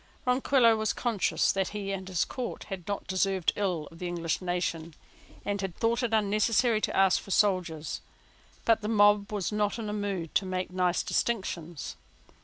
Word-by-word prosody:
Ronquillo, 250 -3 +4
conscious 230 -6 +1
that 190 -1 0
he 200 -1 -4
and 190 -1 -4
his 185 -3 0
court 250 -2 -5
had 190 -4 -6
not 200 -1 -3
deserved 190 -1 +1
ill 180 -7 -1
of 165 - -14
the 180 - -3
English 170 -1 -2
nation, 170 -3 -2 0.5
had 195 -3 -2
thought 230 +2 +1
it 240 -2 -1
unnecessary 215 +2 +2
to - - -1
ask 190 -1 +4
for - - -13
soldiers: 185 -6 +1 0.6
but 225 -1 +4
the 210 - -3
mob 205 -1 +4
was 205 -2 -2
not 210 0 0
in 220 -2 -4
a - - -3
mood 200 -6 -3
to - - +3
make 185 -1 -3
nice 180 -1 +1
distinctions. 175 -8 -2
195 Hz, 170 wpm, -29 LUFS, 180-215 Hz, 0.6 s, Ronquillo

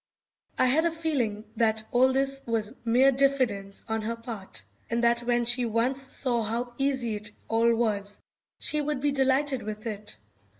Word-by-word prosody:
I - - +4
had 295 +6 +3
a - - +3
feeling 275 -11 -1
that 220 -1 +2
all 255 +2 +4
this 270 +1 +1
was 225 -2 -1
mere 250 +4 +4
diffidence 250 -8 +1
on 220 -1 -1
her 230 +2 -3
part, 225 - -7 0.3
and 235 +1 -1
that 235 0 +4
when 240 0 0
she 245 +1 +5
once 235 +4 0
saw 255 -3 0
how 235 +3 -3
easy 260 -6 0
it 210 0 -5 0.2
all 230 +1 +3
was 205 -3 -2 0.4
she 300 - 0
would 295 -1 -2
be 290 +2 +1
delighted 270 0 +1
with 215 +1 -7
it. 210 -2 -6
235 Hz, 170 wpm, -27 LUFS, 220-270 Hz, 0.4 s, she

